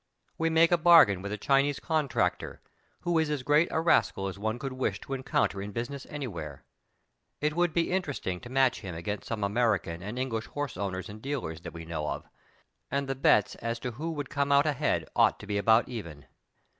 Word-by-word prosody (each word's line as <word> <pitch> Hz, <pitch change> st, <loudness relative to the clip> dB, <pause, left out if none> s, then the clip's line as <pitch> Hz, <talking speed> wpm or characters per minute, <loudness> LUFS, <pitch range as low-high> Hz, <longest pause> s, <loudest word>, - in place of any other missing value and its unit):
We 165 Hz, 0 st, 0 dB
make 165 Hz, +1 st, +4 dB
a 175 Hz, -, +4 dB
bargain 155 Hz, -, +7 dB
with 100 Hz, +1 st, -5 dB
a 105 Hz, -, -2 dB
Chinese 140 Hz, +5 st, +2 dB
con 155 Hz, -3 st, 0 dB
tractor, -, -, -1 dB, 0.4 s
who 175 Hz, -2 st, +1 dB
is 160 Hz, -1 st, +1 dB
as 145 Hz, -4 st, -2 dB
great 150 Hz, +5 st, +4 dB
a -, -, 0 dB
rascal 160 Hz, -, +2 dB
as 95 Hz, 0 st, -6 dB
one 110 Hz, +3 st, -1 dB
could 135 Hz, +1 st, -5 dB
wish 110 Hz, -7 st, -1 dB
to 135 Hz, -, -6 dB
encounter 130 Hz, -6 st, 0 dB
in 100 Hz, +1 st, -6 dB
business 130 Hz, +5 st, -5 dB
anywhere; 85 Hz, -, -6 dB, 0.7 s
it 150 Hz, +1 st, 0 dB
would 175 Hz, -1 st, +2 dB
be 170 Hz, +2 st, 0 dB
interesting 145 Hz, -, -2 dB
to 120 Hz, -, -11 dB
match 130 Hz, -2 st, +2 dB
him 95 Hz, -5 st, -6 dB
against 100 Hz, +5 st, -4 dB
some 110 Hz, -3 st, -3 dB
American 100 Hz, -5 st, 0 dB
and 105 Hz, +6 st, -6 dB
English 115 Hz, -4 st, -2 dB
horse 145 Hz, -4 st, -4 dB
owners 95 Hz, -1 st, -3 dB
and 105 Hz, +1 st, -10 dB
dealers 120 Hz, -, -4 dB
that -, -, -8 dB
we 85 Hz, -1 st, -8 dB
know 80 Hz, -2 st, -3 dB
of, -, -, -4 dB, 0.6 s
and 140 Hz, 0 st, -1 dB
the 135 Hz, -, 0 dB
bets 105 Hz, -6 st, +3 dB
as 115 Hz, 0 st, -3 dB
to 125 Hz, -, -3 dB
who 150 Hz, +8 st, -5 dB
would 145 Hz, -3 st, -5 dB
come 140 Hz, 0 st, 0 dB
out 140 Hz, +1 st, +5 dB
ahead 150 Hz, -1 st, 0 dB
ought -, -, +4 dB
to -, -, -9 dB
be 100 Hz, 0 st, -1 dB
about 110 Hz, +3 st, +4 dB
even. 85 Hz, -, -7 dB
125 Hz, 210 wpm, -29 LUFS, 100-145 Hz, 0.7 s, bargain